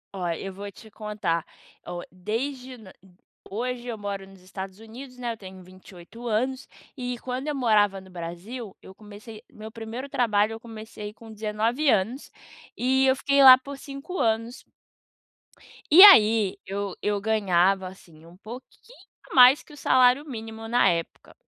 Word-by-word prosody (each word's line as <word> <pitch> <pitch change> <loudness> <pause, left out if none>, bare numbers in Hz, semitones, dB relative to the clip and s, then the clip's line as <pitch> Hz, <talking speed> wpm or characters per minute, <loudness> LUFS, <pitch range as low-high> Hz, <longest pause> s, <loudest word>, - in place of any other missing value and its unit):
Ó, 180 -2 -3
eu 190 +3 -5
vou 200 +1 -8
te 220 +2 -16
contar, 210 -7 -3 0.4
ó, 175 0 -6
desde 250 +8 -5
n 210 -5 -14 0.6
hoje 245 +3 -4
eu 230 -2 -4
moro 200 -1 -6
nos 195 -1 -17
Estados 190 0 -8
Unidos, 250 +4 -12
né, 245 -1 -3
eu - - -13
tenho 190 -2 -12
28 185 +5 -13
anos, 255 +4 -2 0.3
e 250 -2 -4
quando 255 +4 -5
eu 300 - -2
morava 210 -6 +2
no 190 -1 -16
Brasil, 180 +6 -8
eu 190 - -14
comecei 210 +2 -13
meu 215 +1 -10
primeiro 230 +4 -7
trabalho 220 -5 +1
eu 225 - -8
comecei 215 -2 -9
com 225 0 -14
19 220 +7 -1
anos, 225 +5 0 0.5
e 265 +2 +2
eu 260 - +4
fiquei 280 +1 +2
lá 255 -1 +11
por 280 +2 -9
5 275 +6 -8
anos. 230 +2 -1 1.3
E 335 +5 +9
aí 220 - +7
eu 200 -1 -4
eu 205 -1 -1
ganhava, 195 -3 +1
assim, 170 -4 -15
um 170 +1 -16
pouquinho 250 - -13 0.4
mais 255 +2 +7
que - - -17
o 295 - -13
salário 255 +2 +3
mínimo 225 -4 -8
na 240 +2 +3
época. 170 -1 -4
220 Hz, 160 wpm, -25 LUFS, 195-250 Hz, 1.3 s, lá